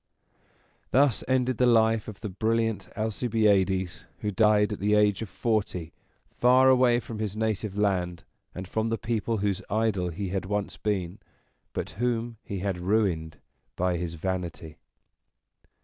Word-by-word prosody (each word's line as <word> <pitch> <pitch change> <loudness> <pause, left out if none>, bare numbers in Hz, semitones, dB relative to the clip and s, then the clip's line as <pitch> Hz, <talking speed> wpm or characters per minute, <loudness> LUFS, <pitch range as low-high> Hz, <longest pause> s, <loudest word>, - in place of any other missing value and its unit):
Thus 135 -4 +3
ended 130 -2 +1
the 125 - +5
life 115 -2 +3
of 105 -3 -9
the 105 - -4
brilliant 115 +2 -1
Alcibiades, 105 -5 +1 0.2
who 105 - -1
died 105 +1 +3
at - - -6
the 105 +1 +2
age 105 -1 +3
of 110 - -5
forty, 95 -8 -2 0.4
far 130 +2 +5
away 125 -2 +5
from 115 -2 -7
his 105 -1 -3
native 110 -2 -2
land, 90 -4 0 0.3
and 95 0 -6
from 110 +4 -1
the 115 - 0
people 115 0 -1
whose 100 -2 -1
idol 105 -3 0
he 95 +3 -4
had 95 0 -2
once 105 +1 -2
been, 95 -3 -2 0.5
but - - -4
whom 120 -1 -1
he 100 - -5
had 95 -2 -2
ruined 90 -6 0 0.4
by 90 -1 0
his 85 -1 -4
vanity. 85 -3 -4
105 Hz, 150 wpm, -27 LUFS, 95-115 Hz, 0.5 s, the